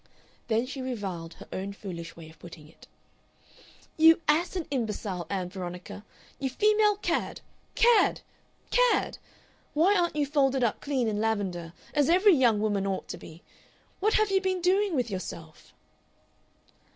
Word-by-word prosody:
Then 225 +1 +1
she 270 +1 -6
reviled 195 -10 -5
her - - -13
own 195 +1 -4
foolish 170 -4 -8
way 165 -1 -11
of 160 - -21
putting 165 -3 -12
it. 160 - -19 1.1
"You 325 +1 +7
ass 335 +5 +2
and 350 -4 -2
imbecile, 210 - -3
Ann 185 -3 -2
Veronica! 180 +1 -7 0.4
You 270 - -1
female 420 +7 +3
cad! - - -2 0.3
Cad! 470 0 +4 0.5
Cad!... - - +2 0.6
Why 355 +7 +4
aren't 345 -4 +1
you 295 -1 +1
folded 270 -2 +1
up 230 - 0
clean 265 -5 -1
in 210 -1 -1
lavender 190 -7 -2 0.2
as 290 -1 +2
every 375 +4 +6
young 240 -8 +3
woman 205 -2 0
ought 190 -1 -3
to - - -5
be? 160 0 -13 0.6
What 430 +3 +2
have 430 -2 +2
you 385 0 +3
been 375 -1 0
doing 375 +1 +2
with 245 -5 -1
yourself?..." 165 -4 -7
245 Hz, 150 wpm, -28 LUFS, -, 1.1 s, You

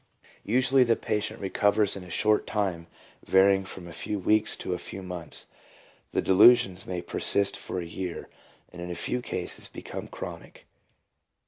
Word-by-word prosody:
Usually 130 +4 +4
the 115 -2 +3
patient 105 +1 -2
recovers 100 +1 +2
in 100 - -7
a 90 - -12
short 105 +4 +2
time 95 -6 -2 0.4
varying 95 0 +4
from 95 -2 -8
a 85 - -9
few 105 - -3
weeks 110 +3 +2
to 90 - -4
a 90 - -3
few 95 - -7
months. 90 -3 -5 0.6
The - - -1
delusions 95 -1 +5
may 90 -1 -4
persist 100 -1 +1
for 90 - -4
a 85 - -4
year, 90 +1 -5 0.5
and 90 - -9
in 90 - -5
a 90 - -4
few 125 +8 -2
cases - - -4
become - - -7
chronic. - - -9
95 Hz, 160 wpm, -27 LUFS, 90-105 Hz, 0.6 s, delusions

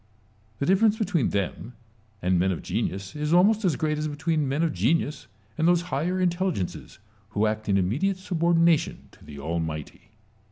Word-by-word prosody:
The 140 - -1
difference 205 +5 +3
between 180 - +1
them 100 +4 -3 0.5
and 90 0 +2
men 95 +2 +2
of 90 - -4
genius 95 +7 -3
is 150 +1 -1
almost 205 +5 +4
as 175 -6 +2
great 150 0 -1
as 155 - -1
between 150 -1 -1
men 145 +5 0
of 165 - 0
genius 145 - 0 0.3
and 160 - +3
those 175 -1 +4
higher 180 +6 0
intelligences 175 - -2 0.3
who 105 0 0
act 110 0 -2
in 100 - +3
immediate 140 - 0
subordina 170 -3 +3
tion - - -8
to - - -20
the 75 - -11
Almighty. 80 +2 -5
150 Hz, 170 wpm, -26 LUFS, -, 0.5 s, almost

